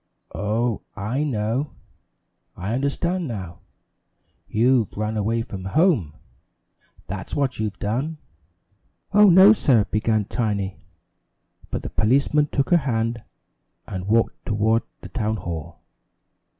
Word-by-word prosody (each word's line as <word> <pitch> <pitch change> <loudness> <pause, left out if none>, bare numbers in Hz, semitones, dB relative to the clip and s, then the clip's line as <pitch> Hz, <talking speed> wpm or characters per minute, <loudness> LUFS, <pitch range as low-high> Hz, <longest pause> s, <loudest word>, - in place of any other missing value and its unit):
Oh, 110 +3 -1
I 110 +8 -2
know 125 +1 -1 0.8
I 100 +5 -3
understand 165 +7 -1
now 95 -8 -6 0.9
you've 120 -1 +2
run 110 +1 -2
away 115 +2 0
from 95 -4 -7
home 120 - +2 0.9
that's 95 0 -6
what 135 -5 -1
you've 105 -2 -2
done!" 130 +10 -2 1.0
"Oh, 210 +1 +7
no, 190 +3 +8
sir," 130 - +3
began 110 -1 +1
Tiny, 100 -4 -2 0.9
but - - -4
the - - -4
policeman 140 +6 +2
took 140 +2 -1
her 175 - +7
hand, 115 -5 -1 0.6
and 95 0 -6
walked 115 +2 +1
toward 110 +2 +1 0.2
the - - -9
town 110 -2 -1
hall. 85 -5 -7
115 Hz, 115 wpm, -23 LUFS, 105-140 Hz, 1.0 s, no